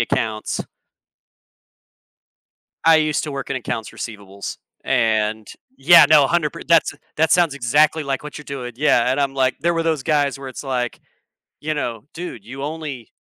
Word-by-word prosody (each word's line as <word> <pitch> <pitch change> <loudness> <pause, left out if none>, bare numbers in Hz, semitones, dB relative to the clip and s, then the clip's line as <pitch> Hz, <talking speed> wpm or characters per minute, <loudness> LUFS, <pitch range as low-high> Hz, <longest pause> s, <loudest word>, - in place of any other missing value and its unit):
accounts? 110 -1 -2 2.2
I 165 -1 +7
used 155 -1 +1
to 150 - -5
work 140 0 -5
in 140 - -1
accounts 115 -3 -4
receivables 100 -3 -7 0.3
and 110 -1 +1 0.3
Yeah, 160 +6 +8
no, 150 -3 +7
a - - 0
hundred 170 -3 +1
per - - -9
that's 165 -2 +4
a 145 - -18 0.2
that 160 +1 +3
sounds 170 -5 +3
exactly 145 +5 +2
like 135 -1 -2
what 150 - -8
you're 150 - -11
doing, 130 -4 -6
yeah, 125 -3 +3
and 130 - 0
I'm 135 -1 0
like, 130 -1 +1
there 170 +4 +2
were 165 - 0
those 160 -4 0
guys 145 -2 +1
where 135 -1 -7
it's 130 - -8
like, 125 -3 -3 0.6
you 155 +1 -2
know, 120 -6 -4
"Dude, 165 - -7
you 135 +3 -8
only 150 -6 -6
140 Hz, 175 wpm, -21 LUFS, 120-155 Hz, 2.2 s, Yeah